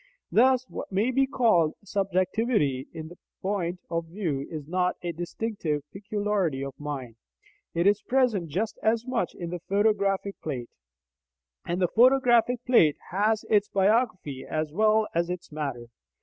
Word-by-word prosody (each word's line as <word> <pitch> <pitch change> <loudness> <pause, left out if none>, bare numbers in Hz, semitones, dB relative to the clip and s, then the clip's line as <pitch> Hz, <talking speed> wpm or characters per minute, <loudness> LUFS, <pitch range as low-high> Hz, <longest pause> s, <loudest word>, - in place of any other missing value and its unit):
Thus 255 +2 +4
what - - -7
may 205 +7 +1
be 270 +1 +2
called 220 - +3
subjectivity 190 - 0
in 160 -1 -7
the 175 - -14 0.2
point 180 -2 -2
of 165 0 -1
view 160 -7 -3
is 155 -3 -7
not 180 +1 0
a 175 - -1
distinctive 175 -2 -3
peculiarity 200 -8 -1
of 135 - -6
mind: 135 -6 -6 0.6
it 170 +1 +1
is 205 +1 +4
present 240 -10 +1
just 205 +9 -2
as 225 +1 +1
much 250 -8 -2
in 170 -1 -6
the 180 - -4
photographic 200 -1 +1
plate. 130 -6 -5 1.0
And 175 +1 -1
the 180 - +3
photographic 245 +1 +4
plate 165 - +5
has 210 +4 +1
its 210 -1 +3
biography 195 - +1
as 155 -1 -3
well 215 +3 +3
as 170 +1 0
its 180 -1 -6
"matter." 140 -6 -4
190 Hz, 150 wpm, -27 LUFS, 160-220 Hz, 1.0 s, plate